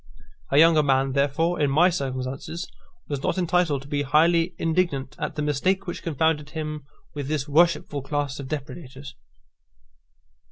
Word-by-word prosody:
A 140 Hz, -, +2 dB
young 160 Hz, 0 st, +6 dB
man, 135 Hz, -1 st, +2 dB
therefore, 145 Hz, +5 st, +1 dB
in 145 Hz, -, +3 dB
my 170 Hz, +7 st, +4 dB
circumstances 135 Hz, +3 st, -4 dB, 0.4 s
was 140 Hz, -2 st, -3 dB
not -, -, -1 dB
entitled 175 Hz, -5 st, +1 dB
to -, -, -13 dB
be 145 Hz, -1 st, -1 dB
highly 165 Hz, +5 st, +3 dB
indignant 160 Hz, -6 st, -1 dB
at -, -, -3 dB
the 150 Hz, -, -2 dB
mistake 185 Hz, +7 st, 0 dB
which 175 Hz, -, -5 dB
confounded 160 Hz, -2 st, 0 dB
him 150 Hz, -2 st, -5 dB, 0.3 s
with 145 Hz, -2 st, -5 dB
this 150 Hz, -1 st, -2 dB
worshipful 150 Hz, -2 st, +2 dB
class 145 Hz, 0 st, -3 dB
of 140 Hz, -, -6 dB
depredators. 140 Hz, -2 st, -7 dB
150 Hz, 150 wpm, -24 LUFS, 140-165 Hz, 0.4 s, young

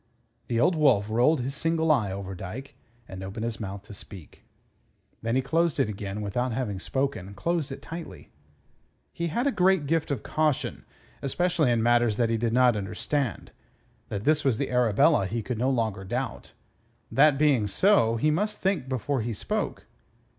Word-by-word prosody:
The 115 Hz, -1 st, 0 dB
Old 170 Hz, +6 st, +3 dB
Wolf 120 Hz, -9 st, +3 dB
rolled 125 Hz, +6 st, +3 dB
his 130 Hz, +3 st, -3 dB
single 160 Hz, +2 st, +1 dB
eye 110 Hz, -10 st, +2 dB
over 95 Hz, 0 st, -5 dB
Dyke, 100 Hz, +9 st, -7 dB, 0.3 s
and 95 Hz, 0 st, -8 dB
opened 95 Hz, +4 st, -5 dB
his 115 Hz, -1 st, -3 dB
mouth 100 Hz, -2 st, -6 dB
to 105 Hz, -, -11 dB
speak. 95 Hz, -4 st, -12 dB, 0.8 s
Then 115 Hz, +1 st, -1 dB
he 130 Hz, -, +2 dB
closed 165 Hz, +2 st, +1 dB
it -, -, +2 dB
again 100 Hz, 0 st, -5 dB
without 120 Hz, +5 st, -1 dB
having 110 Hz, -6 st, -2 dB
spoken; 130 Hz, -5 st, -3 dB
closed 165 Hz, -, -1 dB
it 135 Hz, -, -8 dB
tightly. 165 Hz, +1 st, -9 dB, 0.8 s
He 170 Hz, -, -2 dB
had 235 Hz, -, -1 dB
a 280 Hz, -, +3 dB
great 185 Hz, -, +3 dB
gift 160 Hz, +2 st, 0 dB
of 140 Hz, -, -2 dB
caution, 155 Hz, -3 st, -1 dB, 0.4 s
especially 165 Hz, +1 st, +1 dB
in 115 Hz, -2 st, +2 dB
matters 120 Hz, -2 st, +3 dB
that 115 Hz, -2 st, +1 dB
he 115 Hz, -, +1 dB
did 115 Hz, 0 st, 0 dB
not 125 Hz, -1 st, +4 dB
understand. 110 Hz, +6 st, -3 dB, 0.6 s
That 100 Hz, 0 st, -4 dB
this 155 Hz, +3 st, +2 dB
was 130 Hz, -5 st, +2 dB
the -, -, -2 dB
Arabella 125 Hz, -, +3 dB
he 115 Hz, +3 st, -3 dB
could 120 Hz, 0 st, -4 dB
no 130 Hz, +2 st, +2 dB
longer 110 Hz, -7 st, -1 dB
doubt. 120 Hz, +5 st, -4 dB, 0.6 s
That 145 Hz, 0 st, +5 dB
being 140 Hz, -8 st, +3 dB
so, 115 Hz, -, +3 dB
he 150 Hz, +7 st, +2 dB
must 210 Hz, +7 st, -1 dB
think 190 Hz, -9 st, -1 dB
before 130 Hz, +1 st, -1 dB
he 115 Hz, +1 st, -3 dB
spoke. 105 Hz, -, -3 dB
125 Hz, 175 wpm, -27 LUFS, 110-150 Hz, 0.8 s, That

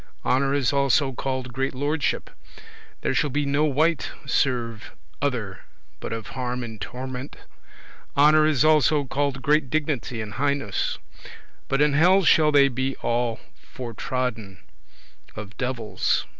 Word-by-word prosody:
Honour 135 Hz, +2 st, +2 dB
is 140 Hz, -2 st, +1 dB
also 140 Hz, 0 st, +2 dB
called 130 Hz, -1 st, -4 dB
great 135 Hz, +1 st, -2 dB
lordship. 145 Hz, +2 st, -1 dB, 0.7 s
There -, -, 0 dB
shall 150 Hz, -, +1 dB
no 145 Hz, +2 st, +1 dB
wight 155 Hz, +2 st, +1 dB, 0.2 s
serve 120 Hz, -5 st, -1 dB, 0.3 s
other, 120 Hz, -9 st, -2 dB, 0.4 s
but -, -, -6 dB
of 115 Hz, -1 st, -5 dB
harm 125 Hz, -1 st, -3 dB
and 110 Hz, -3 st, -8 dB
torment. 130 Hz, +3 st, -6 dB, 0.8 s
Honour 155 Hz, +2 st, +6 dB
is 155 Hz, -2 st, +2 dB
also 155 Hz, -1 st, +4 dB
called 135 Hz, 0 st, -2 dB
great 150 Hz, -1 st, +2 dB
dignity 145 Hz, -6 st, -2 dB
and 105 Hz, -1 st, -5 dB
highness; 140 Hz, -5 st, -1 dB, 0.7 s
but 135 Hz, +2 st, +2 dB
in 150 Hz, -1 st, +2 dB
hell 180 Hz, +6 st, +5 dB
shall 155 Hz, -2 st, +5 dB
they 140 Hz, -1 st, +6 dB
be 130 Hz, +1 st, -2 dB
all 120 Hz, -1 st, 0 dB, 0.2 s
fortrodden 120 Hz, -4 st, -4 dB
[trampled -, -, -22 dB
under 65 Hz, -3 st, -29 dB
foot] -, -, -6 dB
of 105 Hz, +1 st, -16 dB
devils. 125 Hz, -4 st, -1 dB
135 Hz, 140 wpm, -24 LUFS, 120-145 Hz, 0.8 s, Honour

